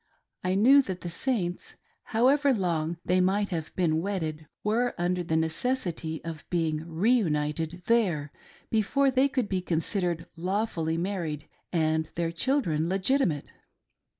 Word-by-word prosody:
I 185 Hz, +1 st, +1 dB
knew 260 Hz, +8 st, +7 dB
that 185 Hz, -8 st, -5 dB
the 175 Hz, -, -5 dB
Saints, 180 Hz, -3 st, -2 dB, 0.3 s
however 275 Hz, +5 st, +3 dB
long 170 Hz, -4 st, -1 dB
they 185 Hz, +1 st, +3 dB
might 200 Hz, +2 st, +1 dB
have 160 Hz, -4 st, -4 dB
been 160 Hz, -3 st, +1 dB
wedded, 160 Hz, -6 st, -3 dB, 0.2 s
were 235 Hz, +4 st, +1 dB
under 180 Hz, +1 st, 0 dB
the 160 Hz, -1 st, 0 dB
necessity 165 Hz, -2 st, -1 dB
of 160 Hz, -2 st, -6 dB
being 160 Hz, -3 st, 0 dB
reunited 165 Hz, -4 st, 0 dB
there 180 Hz, -11 st, +1 dB, 0.4 s
before 270 Hz, +6 st, +2 dB
they 260 Hz, +2 st, +4 dB
could 255 Hz, -5 st, -1 dB
be 190 Hz, -2 st, -1 dB
con 175 Hz, -2 st, -1 dB
sidered 175 Hz, -1 st, -1 dB
lawfully 175 Hz, -2 st, -1 dB
married 170 Hz, -5 st, -3 dB, 0.2 s
and 160 Hz, -2 st, +1 dB
their 165 Hz, -1 st, -1 dB
children 170 Hz, -, 0 dB
legitimate. 190 Hz, -, +1 dB
175 Hz, 135 wpm, -28 LUFS, 160-215 Hz, 0.4 s, knew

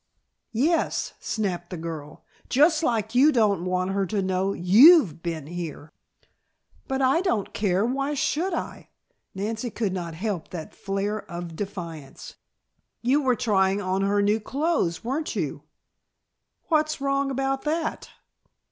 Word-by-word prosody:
"Yes," 315 Hz, +9 st, +1 dB
snapped 180 Hz, -5 st, -3 dB
the 180 Hz, -, -5 dB
girl, 160 Hz, -3 st, -7 dB, 0.2 s
"just 305 Hz, +5 st, +4 dB
like 225 Hz, -6 st, 0 dB
you 275 Hz, +5 st, +6 dB
don't 205 Hz, -, +2 dB
want 185 Hz, +1 st, 0 dB
her 195 Hz, -1 st, 0 dB
to 200 Hz, +1 st, -1 dB
know 190 Hz, +1 st, 0 dB
you've 200 Hz, -, +6 dB
been 165 Hz, -4 st, -4 dB
here." 160 Hz, -2 st, -7 dB, 1.0 s
"But 265 Hz, 0 st, -1 dB
I 270 Hz, +6 st, +3 dB
don't 230 Hz, -, -1 dB
care; 200 Hz, 0 st, +1 dB
why 275 Hz, +4 st, -1 dB
should 330 Hz, +6 st, 0 dB
I?" -, -, -5 dB, 0.5 s
Nancy 220 Hz, +5 st, -3 dB
could 210 Hz, -4 st, -2 dB
not 170 Hz, -3 st, -4 dB
help 190 Hz, -2 st, -3 dB
that 165 Hz, -3 st, -7 dB
flare 200 Hz, +2 st, -2 dB
of 170 Hz, -1 st, -6 dB
defiance. 170 Hz, -7 st, -7 dB, 0.7 s
"You 265 Hz, +5 st, +3 dB
were 255 Hz, -3 st, +2 dB
trying 200 Hz, -5 st, +2 dB
on 190 Hz, -1 st, -1 dB
her 200 Hz, +1 st, +2 dB
new 210 Hz, +2 st, +2 dB
clothes, 275 Hz, -, -1 dB
weren't 270 Hz, +4 st, -2 dB
you?" 150 Hz, -5 st, -3 dB, 1.0 s
"What's 310 Hz, -2 st, +1 dB
wrong 275 Hz, 0 st, 0 dB
about 270 Hz, 0 st, -1 dB
that?" 315 Hz, +1 st, -2 dB
205 Hz, 140 wpm, -25 LUFS, 180-270 Hz, 1.0 s, you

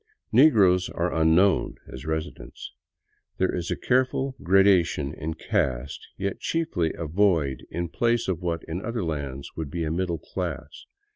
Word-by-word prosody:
Negroes 105 Hz, -9 st, +5 dB
are 85 Hz, +1 st, -2 dB
unknown 80 Hz, +4 st, +3 dB
as 65 Hz, +3 st, -9 dB
residents. 80 Hz, 0 st, -5 dB, 0.7 s
There 95 Hz, -, +1 dB
is 85 Hz, -1 st, -3 dB
a -, -, 0 dB
careful 130 Hz, +1 st, 0 dB
gradation 90 Hz, -6 st, +3 dB
in 80 Hz, +1 st, -5 dB
caste, 65 Hz, +1 st, -2 dB
yet 100 Hz, 0 st, -3 dB
chiefly 160 Hz, -, -1 dB
a 85 Hz, -, -5 dB
void 80 Hz, -5 st, +1 dB
in 85 Hz, 0 st, -3 dB
place 120 Hz, +6 st, 0 dB
of 90 Hz, -2 st, -2 dB
what, 85 Hz, -2 st, -2 dB
in 85 Hz, +4 st, -5 dB
other 115 Hz, -2 st, -2 dB
lands, 70 Hz, -4 st, -4 dB
would 80 Hz, -3 st, -4 dB
be 85 Hz, +3 st, -3 dB
a 80 Hz, -, -2 dB
middle 85 Hz, 0 st, -1 dB
class. 75 Hz, -1 st, -6 dB
85 Hz, 150 wpm, -25 LUFS, 80-100 Hz, 0.7 s, Negroes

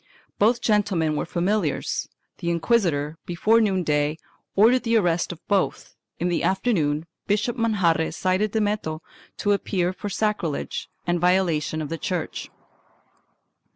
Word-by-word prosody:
Both 230 Hz, +4 st, +3 dB
gentlemen 195 Hz, -8 st, +1 dB
were -, -, -2 dB
familiars. 180 Hz, -2 st, -1 dB, 0.3 s
The 170 Hz, -, -2 dB
inquisitor, 165 Hz, -4 st, +1 dB
before 215 Hz, +6 st, +3 dB
noon 190 Hz, -4 st, +1 dB
day, 150 Hz, 0 st, +1 dB, 0.4 s
ordered 235 Hz, +5 st, +5 dB
the 230 Hz, -1 st, +2 dB
arrest 175 Hz, -5 st, +1 dB
of 170 Hz, -, -12 dB
both; 200 Hz, -2 st, 0 dB, 0.2 s
in 175 Hz, -, -1 dB
the 175 Hz, -, 0 dB
afternoon 170 Hz, -7 st, +1 dB, 0.2 s
Bishop 215 Hz, +4 st, +1 dB
Manjarre 190 Hz, -9 st, +1 dB
cited 185 Hz, +5 st, 0 dB
Dameto 205 Hz, -7 st, -1 dB, 0.4 s
to 205 Hz, -, +1 dB
appear 185 Hz, -3 st, 0 dB
for 205 Hz, -, -5 dB
sacrilege 200 Hz, -7 st, -2 dB, 0.2 s
and 175 Hz, 0 st, +1 dB
violation 170 Hz, -4 st, +1 dB
of 145 Hz, -, -6 dB
the 165 Hz, 0 st, -4 dB
church. 180 Hz, -4 st, -3 dB
185 Hz, 130 wpm, -24 LUFS, 165-210 Hz, 0.4 s, ordered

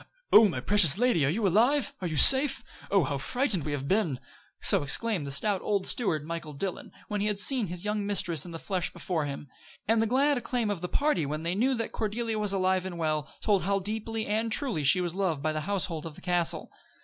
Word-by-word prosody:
"Oh, 215 Hz, 0 st, +8 dB
my 130 Hz, -, -3 dB
precious 190 Hz, -2 st, +4 dB
lady, 240 Hz, -, +2 dB
are -, -, +2 dB
you 205 Hz, +6 st, 0 dB
alive? 240 Hz, -, +2 dB
Are 180 Hz, -, -2 dB
you 155 Hz, -2 st, -4 dB
safe? 270 Hz, -, +6 dB, 0.3 s
Oh! 195 Hz, -3 st, +3 dB
how 140 Hz, 0 st, -3 dB
frightened 210 Hz, -, -1 dB
we 150 Hz, -, -3 dB
have 140 Hz, -1 st, -4 dB
been." 175 Hz, -9 st, 0 dB, 0.4 s
So 195 Hz, -4 st, +3 dB
exclaimed 160 Hz, +3 st, -1 dB
the -, -, -4 dB
stout 195 Hz, +7 st, 0 dB
old 200 Hz, -2 st, -1 dB
steward, 160 Hz, -11 st, 0 dB
Michael 165 Hz, -2 st, -6 dB
Dillon, 180 Hz, +6 st, -5 dB, 0.2 s
when 210 Hz, -1 st, -3 dB
he 210 Hz, -, 0 dB
had 210 Hz, -1 st, -1 dB
seen 235 Hz, +1 st, +3 dB
his 175 Hz, +3 st, -5 dB
young 210 Hz, 0 st, -1 dB
mistress 185 Hz, -7 st, 0 dB
in 180 Hz, -, -8 dB
the 165 Hz, -, -7 dB
flesh 180 Hz, +1 st, -3 dB
before 165 Hz, -5 st, -3 dB
him. 145 Hz, 0 st, -6 dB, 0.4 s
And 225 Hz, +1 st, +3 dB
the 225 Hz, -, +1 dB
glad 275 Hz, +3 st, +2 dB
acclaim 240 Hz, -3 st, -2 dB
of 190 Hz, -5 st, -4 dB
the 180 Hz, -, -4 dB
party, 285 Hz, -, 0 dB
when 155 Hz, +2 st, -4 dB
they 170 Hz, +1 st, -1 dB
knew 255 Hz, +7 st, +1 dB
that 230 Hz, -1 st, -4 dB
Cordelia 220 Hz, +1 st, -3 dB
was 210 Hz, -2 st, 0 dB
alive 185 Hz, -1 st, +1 dB
and 175 Hz, -2 st, -7 dB
well, 155 Hz, -2 st, -2 dB
told 205 Hz, -4 st, +2 dB
how 200 Hz, +1 st, 0 dB
deeply 220 Hz, +3 st, -4 dB
and 220 Hz, +2 st, -1 dB
truly 225 Hz, -, +1 dB
she 140 Hz, +7 st, +3 dB
was 175 Hz, -2 st, -3 dB
loved 180 Hz, -7 st, -2 dB
by 155 Hz, -, 0 dB
the 155 Hz, 0 st, -3 dB
household 170 Hz, -5 st, -3 dB
of 155 Hz, -, -10 dB
the -, -, -13 dB
castle. 175 Hz, -2 st, -1 dB
195 Hz, 235 wpm, -28 LUFS, 165-220 Hz, 0.4 s, Oh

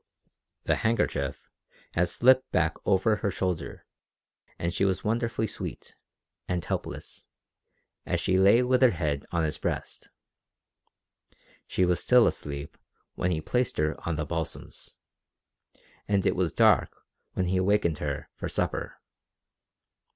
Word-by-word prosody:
The -, -, +1 dB
handkerchief 70 Hz, -, -1 dB, 0.5 s
had 90 Hz, 0 st, +2 dB
slipped 130 Hz, +5 st, +4 dB
back 80 Hz, -3 st, +1 dB
over 105 Hz, +2 st, +3 dB
her 100 Hz, -, -1 dB
shoulder 90 Hz, -3 st, -3 dB, 0.7 s
and 85 Hz, 0 st, -2 dB
she -, -, 0 dB
was 95 Hz, -1 st, +1 dB
wonderfully 115 Hz, 0 st, 0 dB
sweet, -, -, -7 dB, 0.5 s
and 90 Hz, -3 st, -2 dB
helpless, -, -, -5 dB, 0.8 s
as -, -, -1 dB
she 95 Hz, -, +1 dB
lay 100 Hz, +6 st, +6 dB
with 125 Hz, +1 st, +2 dB
her 130 Hz, -, +7 dB
head 75 Hz, -7 st, -2 dB
on 85 Hz, -1 st, +1 dB
his 75 Hz, -1 st, -1 dB
breast. -, -, -4 dB, 1.6 s
She 95 Hz, -, +1 dB
was 90 Hz, -1 st, +2 dB
still 125 Hz, -2 st, +5 dB
asleep 70 Hz, 0 st, -4 dB, 0.3 s
when 90 Hz, -, -1 dB
he 80 Hz, -3 st, -1 dB
placed 125 Hz, +9 st, -1 dB
her 75 Hz, +1 st, +1 dB
on 85 Hz, -, -1 dB
the 75 Hz, 0 st, -2 dB
balsams, 80 Hz, +1 st, -6 dB, 1.1 s
and 100 Hz, -2 st, +1 dB
it -, -, +2 dB
was -, -, 0 dB
dark -, -, +3 dB, 0.3 s
when 90 Hz, -, 0 dB
he 90 Hz, +1 st, 0 dB
awakened 95 Hz, -4 st, +2 dB
her 70 Hz, -2 st, -3 dB
for -, -, -5 dB
supper. -, -, -2 dB
90 Hz, 135 wpm, -27 LUFS, 80-110 Hz, 1.6 s, her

